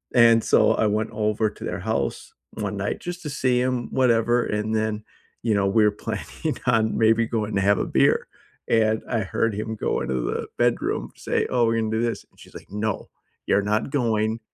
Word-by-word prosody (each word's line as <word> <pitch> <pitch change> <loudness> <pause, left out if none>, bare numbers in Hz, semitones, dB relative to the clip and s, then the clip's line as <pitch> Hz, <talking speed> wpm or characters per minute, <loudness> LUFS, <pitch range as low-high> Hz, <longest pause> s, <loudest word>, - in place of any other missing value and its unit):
And 115 -1 +6
so - - +4
I 110 - +2
went 105 +1 0
over 105 0 0
to - - -12
their 90 - -3
house 70 - -3 0.2
one 105 -2 -4
night 100 +1 -2
just 175 0 -6
to 150 - -4
see 130 -2 +1
him, 125 -2 -1
whatever, 120 -1 +2
and 105 +1 -2
then, 110 -1 -1 0.4
you 115 - +2
know, 100 -1 +2
we're 105 +1 +4
planning 115 +8 -4
on 115 -3 +2
maybe 115 +1 +3
going 110 -3 -2
to 100 - +2
have 100 +1 +3
a - - 0
beer. - - +2 0.4
And 110 -1 +2
I 115 - 0
heard 110 +3 -1
him 110 +1 -4
go - - -1
into 65 - -2
the - - -3
bedroom, - - 0
say, - - -1
"Oh, 120 -2 +2
we're 115 0 +1
gonna 110 - -1
do 110 +1 0
this." 120 -1 -2
And - - -28
she's - - -15
like, - - -12
"No, 105 0 -3 0.4
you're 100 - +3
not 105 +4 0
going. 115 -5 0
110 Hz, 200 wpm, -24 LUFS, 105-115 Hz, 0.4 s, And